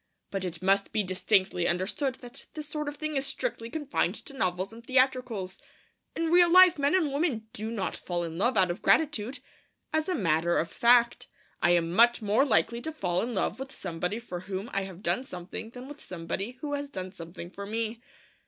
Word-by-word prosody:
But 195 -1 -2
it 180 -1 -5
must 195 +1 +2
be 215 -1 +1
distinctly 185 -1 +1
understood 195 +10 -1
that 245 -1 -10
this 305 -1 -5
sort 300 0 -4
of 290 0 -5
thing 310 -1 -3
is 270 0 -1
strictly 270 - -3
confined 295 0 -1
to 310 - -8
novels 185 -4 -1
and 230 +1 -12
theatricals. 255 -7 +1 0.6
In 330 0 -1
real 350 -1 +6
life, 365 -3 +8
men 285 +4 +3
and 315 -7 +1
women 280 -8 0
do 215 +2 -4
not 220 -5 -2
fall 175 -1 -3
in 165 -1 -5
love 220 +6 +1
out 185 -2 +4
of 175 - -6
gratitude. 280 -5 +2 0.6
As 315 +2 0
a 365 - +1
matter 170 -2 +2
of 165 +1 -1
fact, 235 0 +4 0.3
I 175 0 +5
am 170 0 0
much 235 +4 +5
more 215 +3 +3
likely 235 -2 +2
to 315 - -4
fall 180 - -1
in 235 0 -3
love 190 - -1
with 270 0 -6
somebody 180 +1 -3
for 205 -7 -6
whom 190 +4 -5
I 195 0 0
have 190 0 -10
done 255 - +1
something 180 0 -7
than 250 +2 -10
with 290 +1 -10
somebody 190 +7 -4
who 290 -1 -3
has 285 0 -3
done 185 -7 -5
something 170 0 -9
for 200 +1 -7
me. 225 +1 -2
225 Hz, 205 wpm, -28 LUFS, 185-275 Hz, 0.6 s, life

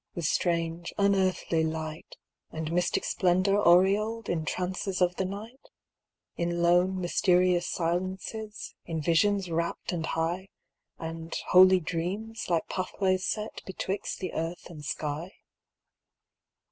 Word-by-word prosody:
With 170 -3 -3
strange, 170 0 0
unearthly 190 -4 +2
light, 160 0 -4 0.3
And 160 0 -4
mystic 180 +1 +1
splendor 185 +3 +2
aureoled, 205 +6 +3
In 160 -2 -1
trances 185 +2 -2
of 180 -1 +2
the 190 - 0
night? 215 +7 -8 0.7
In 170 0 -1
lone, 180 +2 +3
mysterious 180 -1 +2
silences, 185 +5 -3
In 165 -2 -2
visions 180 +4 +2
rapt 170 +1 -2
and 165 -3 -2
high. 170 +4 -1 0.5
And 165 0 -6
holy 185 0 +8
dreams, 185 +8 -4
like 170 -2 +1
pathways 185 0 -1
set 215 0 -3
Betwixt 190 +1 -3
the 185 -3 -5
earth 165 +2 -4
and 150 -3 -10
sky 150 +4 -4
180 Hz, 120 wpm, -28 LUFS, 165-190 Hz, 0.7 s, holy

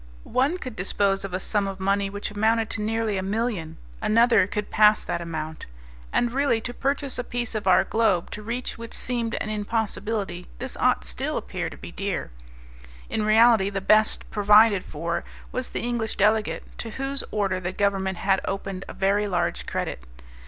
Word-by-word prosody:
One 275 +8 +1
could 255 -10 -7
dispose 195 +1 0
of 195 - -5
a 185 - -2
sum 205 0 0
of 195 -1 -5
money 195 +1 +1
which 205 +1 -5
amounted 220 +2 +1
to 225 - -3
nearly 220 -1 0
a - - -1
million, 200 -4 -2 0.2
another 230 -3 +4
could 210 0 -4
pass 210 0 +5
that - - -3
amount. 160 -2 -5 0.4
And 240 -1 +1
really 275 -4 +2
to 245 +2 -6
purchase 275 0 0
a - - -1
piece 240 -1 -3
of 215 -3 -3
our 185 - +6
globe 220 -6 +1
to 210 - -6
reach 235 +2 -4
which 230 -1 -6
seemed 235 -2 -1
an 215 - -3
impossibility, 210 -3 -2
this - - -5
ought - - +2
still - - -2
appear - - -3
to - - -11
be - - -9
dear. - - -3 0.8
In 215 - 0
reality 220 -2 +5
the 200 -1 -2
best 215 +3 +3
provided 210 -1 +5
for 170 +3 -3 0.3
was 255 0 -3
the - - -3
English 235 -2 -2
delegate, 215 +2 +2 0.2
to 230 - -3
whose 275 +1 +1
order 195 -3 0
the 180 0 -3
Government 190 -1 0
had 195 +1 +2
opened 195 -1 -4
a - - -7
very 200 +2 +1
large 175 - -1
credit. - - -3
210 Hz, 180 wpm, -25 LUFS, 195-230 Hz, 0.8 s, our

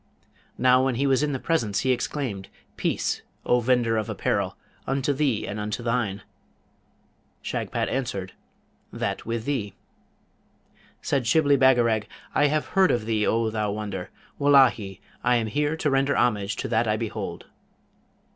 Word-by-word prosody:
Now, 130 +1 +4
when 130 -2 +1
he 135 +4 0
was 135 -1 +3
in 150 -1 0
the 135 - -1
presence, 115 - 0
he 130 - +2
exclaimed, 120 -5 -3 0.3
'Peace, - - -1 0.2
O 125 - +3
vendor 120 -2 +2
of 110 - -2
apparel, - - -1 0.3
unto 135 +1 0
thee 135 -6 0
and 105 - -4
unto 105 +3 -3
thine!' 110 -5 -1 1.2
Shagpat - - -2
answered, 100 -8 -3 0.6
'That - - -3
with 115 -1 -3
thee!' 115 -9 -2 1.3
Said 135 -5 0
Shibli 145 +1 +4
Bagarag, 120 -5 +3 0.3
'I 145 - +4
have 150 +1 0
heard 190 -1 +4
of 120 -3 0
thee, 110 -2 +1
O 115 0 +1
thou 105 -2 -1
wonder! 100 -3 -5 0.3
Wullahy! 130 -9 +4 0.2
I 125 0 +3
am 115 -2 +1
here 150 +7 -1
to 150 -3 0
render 135 +1 +2
homage 105 -4 +1
to - - -4
that 115 +1 +1
I 105 0 +1
behold.' 115 -1 -5
120 Hz, 150 wpm, -25 LUFS, 105-135 Hz, 1.3 s, Now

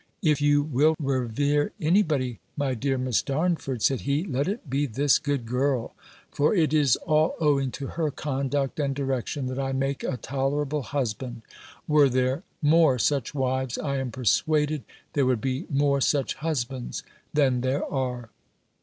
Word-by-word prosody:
"If 150 -3 +3
you 145 0 +4
will 150 +2 +2
revere 140 - 0
any 175 +4 +4
body, 130 - -1 0.2
my 140 -2 0
dear 135 +2 -1
Miss 130 -2 +1
Darnford," 140 -5 -1
said 135 -3 +2
he, 140 +3 0
"let 140 -5 -1
it 200 -3 -4
be 140 +2 0
this 140 +4 +3
good 140 -5 -2
girl; 125 +1 0 0.4
for 150 +8 +2
it 155 -5 +2
is 145 -5 +4
all 155 +1 +1
owing 140 -4 +2
to 140 - -5
her 160 +2 -2
conduct 140 0 -2
and 140 -2 0
direction, 135 0 -2
that 130 +1 -3
I 135 0 -1
make 135 +1 -1
a 130 - -2
tolerable 140 +4 -1
husband: 120 -1 -3 0.4
were 150 -2 +5
there 130 +3 +1 0.2
more 155 -3 +5
such 140 +2 0
wives, 130 -2 -1
I 140 -2 -2
am 135 -1 -2
persuaded, 150 +5 +1 0.3
there 140 -3 +2
would 125 -3 +2
be 130 +3 -2
more 140 -1 +2
such 140 0 +1
husbands 135 -5 -3 0.3
than 135 -5 +2
there 130 +3 0
are." 125 -4 -3
140 Hz, 165 wpm, -26 LUFS, 130-150 Hz, 0.4 s, were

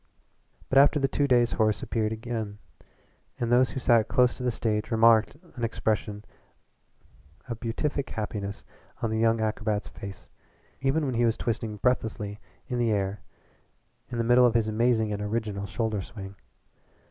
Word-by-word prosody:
But 135 - +5
after 145 +2 +6
the 135 - +2
two 140 +1 0
days 120 -2 +4
Horace 110 -2 +1
appeared 110 -2 -1
again, 110 -2 -4 0.8
and 120 -1 -1
those 125 +1 +5
who - - -4
sat 120 -3 +4
close 125 -2 +3
to - - -10
the 125 - +1
stage 110 -2 -1
remarked 115 +2 +4 0.2
an 120 - -6
expression 110 -2 -1 1.2
of 115 -3 -5
beatific 135 +4 -2
happiness 105 -2 -5 0.4
on 115 - 0
that 110 - 0
young 115 0 +2
acrobat's 110 -1 -1
face 100 0 -9 0.5
even 135 +3 +1
when 130 - -1
he 120 +1 +1
was 115 -1 +1
twisting 115 -2 -3
breathlessly 105 -3 -1 0.3
in 125 -1 -2
the 120 -1 +2
air 100 -1 -1 0.9
an 120 - -4
the 115 - +1
middle 120 +1 +6
of 120 - -1
his 115 -2 +2
amazing 110 -1 +1
and 100 - -4
original 105 -2 -2
shoulder 110 -1 -2
swing. 100 -2 -9
115 Hz, 160 wpm, -27 LUFS, 105-120 Hz, 1.2 s, after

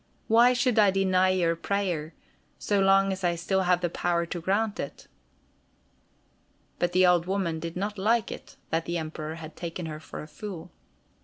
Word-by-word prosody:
"Why 235 +3 +6
should 250 -2 +2
I 205 -2 +6
deny 185 -1 +2
your 175 -3 +2
prayer, 170 -4 -2 0.4
so 205 -1 0
long 195 0 +4
as 190 0 -7
I 175 -1 +2
still 190 +3 0
have 180 -1 +2
the 175 - 0
power 170 -1 0
to 170 0 -5
grant 205 +4 0
it." 140 - -6 1.7
But 175 0 0
the 185 0 +5
old 175 -1 +3
woman 185 -4 -1
did 165 +2 -6
not 205 +2 -3
like 220 +2 +1
it - - -9 0.2
that 165 0 0
the 170 0 -2
Emperor 155 -1 -5
had 160 -1 -10
taken 170 0 -5
her 155 -1 -6
for 155 - -8
a - - -10
fool. 180 -1 -8
180 Hz, 180 wpm, -27 LUFS, 165-195 Hz, 1.7 s, Why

